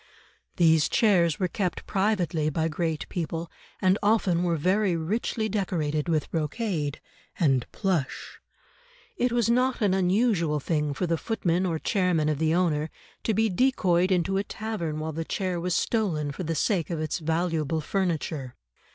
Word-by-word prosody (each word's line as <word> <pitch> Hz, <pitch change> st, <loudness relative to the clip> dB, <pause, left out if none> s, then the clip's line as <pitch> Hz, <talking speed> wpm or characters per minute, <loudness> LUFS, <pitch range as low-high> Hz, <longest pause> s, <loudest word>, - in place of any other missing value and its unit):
These 160 Hz, -4 st, +4 dB
chairs 175 Hz, -8 st, +3 dB
were 185 Hz, -, +1 dB
kept 180 Hz, -1 st, -3 dB
privately 180 Hz, -6 st, 0 dB
by 160 Hz, +2 st, 0 dB
great 160 Hz, -1 st, -2 dB
people, 165 Hz, -1 st, -4 dB, 0.3 s
and 185 Hz, +2 st, +3 dB
often 200 Hz, -5 st, +2 dB
were 175 Hz, -1 st, +1 dB
very 185 Hz, +3 st, +2 dB
richly 215 Hz, +6 st, -1 dB
decorated 170 Hz, -7 st, -1 dB
with 155 Hz, -3 st, 0 dB
brocade 155 Hz, -2 st, -2 dB, 0.4 s
and 135 Hz, -7 st, +2 dB
plush; 180 Hz, -9 st, -2 dB, 0.8 s
it 245 Hz, 0 st, +1 dB
was 240 Hz, -2 st, +2 dB
not 250 Hz, +2 st, +2 dB
an 205 Hz, -4 st, +2 dB
unusual 185 Hz, -4 st, +2 dB
thing 150 Hz, -1 st, -1 dB
for 180 Hz, -, -1 dB
the 165 Hz, -2 st, 0 dB
footmen 185 Hz, -5 st, 0 dB
or 165 Hz, -2 st, -1 dB
chairmen 180 Hz, -4 st, +1 dB
of 150 Hz, -2 st, -1 dB
the 160 Hz, 0 st, +2 dB
owner 160 Hz, -4 st, +1 dB, 0.4 s
to 220 Hz, -, +1 dB
be 225 Hz, +2 st, +3 dB
decoyed 185 Hz, -5 st, +2 dB
into 185 Hz, +1 st, +1 dB
a 195 Hz, -, +1 dB
tavern 205 Hz, -8 st, -4 dB
while 155 Hz, +1 st, -3 dB
the 165 Hz, +2 st, -3 dB
chair 185 Hz, +1 st, -2 dB
was 180 Hz, +1 st, -1 dB
stolen 165 Hz, -11 st, 0 dB
for 140 Hz, -, -7 dB
the 165 Hz, -1 st, -2 dB
sake 175 Hz, +1 st, 0 dB
of 170 Hz, -3 st, -2 dB
its 155 Hz, +1 st, -2 dB
valuable 160 Hz, -1 st, 0 dB
furniture. 155 Hz, -6 st, -2 dB
175 Hz, 160 wpm, -26 LUFS, 155-195 Hz, 0.8 s, These